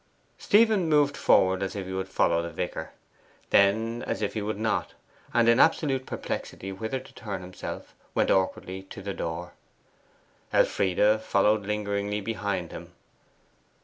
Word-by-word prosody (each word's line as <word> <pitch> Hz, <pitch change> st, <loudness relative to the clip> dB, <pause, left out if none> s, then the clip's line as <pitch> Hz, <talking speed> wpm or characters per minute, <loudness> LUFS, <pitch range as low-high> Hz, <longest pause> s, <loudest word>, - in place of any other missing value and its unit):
Stephen 210 Hz, -5 st, +4 dB
moved 145 Hz, -2 st, +3 dB
forward 95 Hz, 0 st, +3 dB
as 95 Hz, 0 st, -3 dB
if 100 Hz, -2 st, -4 dB
he 95 Hz, -, -6 dB
would 95 Hz, 0 st, -3 dB
follow 85 Hz, -2 st, +2 dB
the 85 Hz, -, -4 dB
vicar, -, -, -4 dB, 0.6 s
then 110 Hz, +4 st, +3 dB
as -, -, -2 dB
if 100 Hz, -, -1 dB
he 110 Hz, -, -2 dB
would 105 Hz, 0 st, -3 dB
not, 110 Hz, 0 st, -1 dB, 0.4 s
and 120 Hz, -1 st, +3 dB
in 115 Hz, +1 st, +5 dB
absolute 135 Hz, -4 st, +3 dB
perplexity 95 Hz, -, -5 dB
whither 110 Hz, +7 st, -3 dB
to -, -, -15 dB
turn 100 Hz, -4 st, -6 dB
himself, 90 Hz, 0 st, -8 dB, 0.2 s
went -, -, +2 dB
awkwardly 95 Hz, 0 st, 0 dB
to 95 Hz, 0 st, -11 dB
the 100 Hz, 0 st, -3 dB
door. 85 Hz, 0 st, -5 dB, 1.0 s
Elfride 105 Hz, +3 st, +3 dB
followed 105 Hz, 0 st, +2 dB
lingeringly 105 Hz, 0 st, -1 dB
behind 100 Hz, -5 st, -3 dB
him. -, -, -9 dB
100 Hz, 145 wpm, -27 LUFS, 95-115 Hz, 1.0 s, in